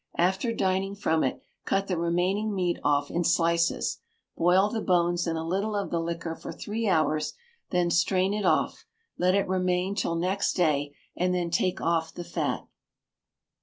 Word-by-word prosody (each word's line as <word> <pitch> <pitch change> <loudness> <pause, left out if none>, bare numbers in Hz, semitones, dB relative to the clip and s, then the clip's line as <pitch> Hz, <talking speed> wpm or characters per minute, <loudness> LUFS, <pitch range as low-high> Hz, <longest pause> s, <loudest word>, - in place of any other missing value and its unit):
After 190 +7 +1
dining 195 -1 0
from 160 -6 +1
it, 130 - -2 0.2
cut 195 0 0
the 190 - -1
remaining 180 +5 0
meat 180 -2 0
off 145 0 +1
in 175 - 0
slices. 170 0 +1 0.4
Boil 180 +4 +4
the 220 +1 -3
bones 175 -2 +2
in 165 - 0
a 160 0 -3
little 200 +5 -1
of 200 -1 -2
the 170 - +1
liquor 165 0 -3
for - - -8
three 220 +2 -3
hours; 155 -4 +1 0.3
then 175 -1 +1
strain 185 +3 +2
it 210 0 -2
off, - - +1 0.3
let 185 +1 +3
it 200 - +1
remain 185 0 0
till 180 -4 -1
next 185 +4 0
day, 145 -5 +1 0.2
and 180 +1 +1
then 175 -2 -1
take 180 +2 0
off 165 -1 0
the 175 - -5
fat. - - -2
180 Hz, 170 wpm, -27 LUFS, 170-195 Hz, 0.4 s, Boil